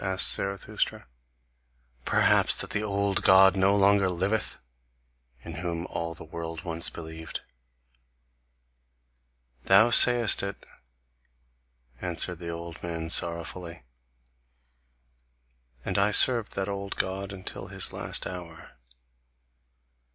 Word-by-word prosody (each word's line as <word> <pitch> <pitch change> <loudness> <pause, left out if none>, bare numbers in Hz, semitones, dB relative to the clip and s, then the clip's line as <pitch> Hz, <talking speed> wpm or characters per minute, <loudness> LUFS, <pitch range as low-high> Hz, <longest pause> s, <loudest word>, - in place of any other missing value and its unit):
asked 95 -2 +3
Zarathustra. 100 0 -4 1.0
"Perhaps - - +3
that - - -5
the 105 - -1
old 100 -2 -1
God 95 0 +6
no 95 +1 +2
longer 100 -1 +3
liveth, 95 +5 -2 0.9
in 85 - -9
whom 85 -1 -4
all 85 -2 -5
the - - -9
world 80 0 -7
once 85 -1 -1
believed?" 80 -1 -8 2.2
"Thou 110 +5 +5
sayest 120 -1 +6
it," 100 0 -7 1.4
answered 90 -1 -2
the 85 -1 -7
old 85 0 -8
man 85 -1 -5
sorrowfully. 85 -2 -2 2.0
"And - - -1
I 100 +1 +3
served 115 +1 +4
that 95 0 -3
old 100 0 -5
God 95 +1 -3
until 95 -2 -7
his - - -1
last - - -4
hour. 85 -6 -10
95 Hz, 105 wpm, -26 LUFS, 85-100 Hz, 2.2 s, God